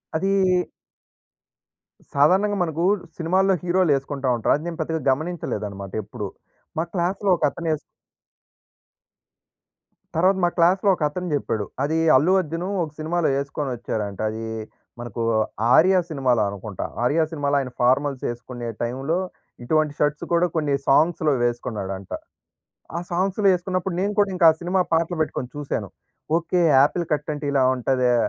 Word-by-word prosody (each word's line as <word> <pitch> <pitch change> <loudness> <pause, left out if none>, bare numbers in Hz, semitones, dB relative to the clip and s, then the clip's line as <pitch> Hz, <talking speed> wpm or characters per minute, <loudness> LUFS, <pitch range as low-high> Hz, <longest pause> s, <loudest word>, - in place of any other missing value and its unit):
అదీ 190 +5 0 1.8
సాధారణంగా 190 +9 +3
మనకు, 165 0 -2 0.3
సినిమాల్లో 185 +3 +2
హీరోలు 180 -2 +2
యేసుకుంటా 135 -1 -2
ఉంటారు. 115 - +2
అది 150 +3 -5
నేను 170 -1 -6
పెద్దగా 160 0 -2
గమనించలేదనమాట, 110 - -4
ఎప్పుడు. 105 0 -6 0.5
మా 160 - +2
క్లాస్‌లో 190 +2 0
ఒక - - -6
అతను 165 +3 -4
ఏస్ 155 - -3 2.4
తర్వాత 185 +4 +3
మా 175 - +4
క్లాస్‌లో 185 +4 +4
ఒక - - -18
అతను 180 +4 -5
జెప్పాడు. 110 -7 -1 0.2
అది 155 +3 0 0.2
అల్లు 155 +8 +4
అర్జున్ 165 +1 -4 0.2
ఒక 155 - -6
సినిమాలో 160 +1 0
యేసుకొని 140 0 -3
వచ్చారంట. 105 -4 -4
అదీ 110 +1 -5 0.6
మనకూ, 120 -1 -5 0.5
'ఆర్య' 185 +3 +6
సినిమాలో 130 -6 +1
అనుకుంటా. 100 0 -6 0.2
'ఆర్య' 155 +6 +3
సినిమాలో 145 -2 0
ఆయన 130 -2 -4
ఫార్మల్స్ 130 +2 +2
యేసుకునే 120 0 -6 0.2
టైమ్‌లో, 135 +7 -1 0.5
ఇటువంటి 155 +3 +1
షర్ట్స్ 150 0 0
కూడా 170 +1 +4
కొన్ని 150 -3 +1
సాంగ్స్‌లో 155 +1 +3
వేసుకున్నాడంట. 100 -6 -3 0.9
ఆ - - 0
సాంగ్స్‌లో 195 +3 +1
యేసుకున్నప్పుడు, 185 0 -2
నేను 205 +2 0
కూడా 200 -1 +3
ఇంకా 175 -2 +6
ఆ - - -5
సినిమా 180 +2 +1
పాటలు 165 +1 +1
పెట్టుకొని 130 -5 -2
చూసాను. 145 -1 -3 0.5
ఓకే, 175 +1 0 0.2
ఆపిల్ 170 +4 0
కట్ 150 0 -1
అంటే 145 0 -6
ఇలా 135 -2 +3
ఉంటదా! 125 -1 +1
155 Hz, 135 wpm, -23 LUFS, 130-175 Hz, 2.4 s, ఆర్య